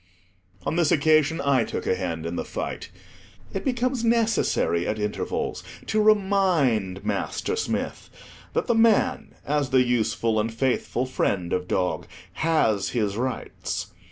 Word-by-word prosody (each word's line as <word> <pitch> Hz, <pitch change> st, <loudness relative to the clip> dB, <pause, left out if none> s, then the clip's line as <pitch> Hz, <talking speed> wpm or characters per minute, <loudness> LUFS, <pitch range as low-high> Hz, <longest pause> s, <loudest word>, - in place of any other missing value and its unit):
On 160 Hz, -, -1 dB
this 170 Hz, -4 st, +3 dB
occasion, 155 Hz, +1 st, +3 dB
I 140 Hz, -4 st, +3 dB
took -, -, -4 dB
a -, -, +2 dB
hand 85 Hz, -3 st, -3 dB
in 85 Hz, +1 st, -3 dB
the -, -, -2 dB
fight. -, -, -5 dB, 0.6 s
It 195 Hz, -, -3 dB
becomes 250 Hz, -1 st, 0 dB
necessary 225 Hz, -, +2 dB
at 105 Hz, -, -1 dB
intervals 105 Hz, -1 st, -2 dB, 0.2 s
to 215 Hz, 0 st, +1 dB
remind 180 Hz, -, +2 dB
Master 435 Hz, -, -2 dB
Smith 450 Hz, -, -3 dB, 0.4 s
that -, -, 0 dB
the 240 Hz, -, +2 dB
man, 225 Hz, -1 st, +2 dB
as 145 Hz, -2 st, 0 dB
the 130 Hz, -1 st, +4 dB
useful 115 Hz, -2 st, +1 dB
and 110 Hz, +2 st, -1 dB
faithful 125 Hz, +1 st, 0 dB
friend 95 Hz, -8 st, -1 dB
of 90 Hz, 0 st, -1 dB
dog, 90 Hz, 0 st, -1 dB, 0.3 s
has 115 Hz, -12 st, +1 dB
his 105 Hz, -5 st, -1 dB
rights. 125 Hz, +3 st, -4 dB
130 Hz, 140 wpm, -25 LUFS, -, 0.6 s, the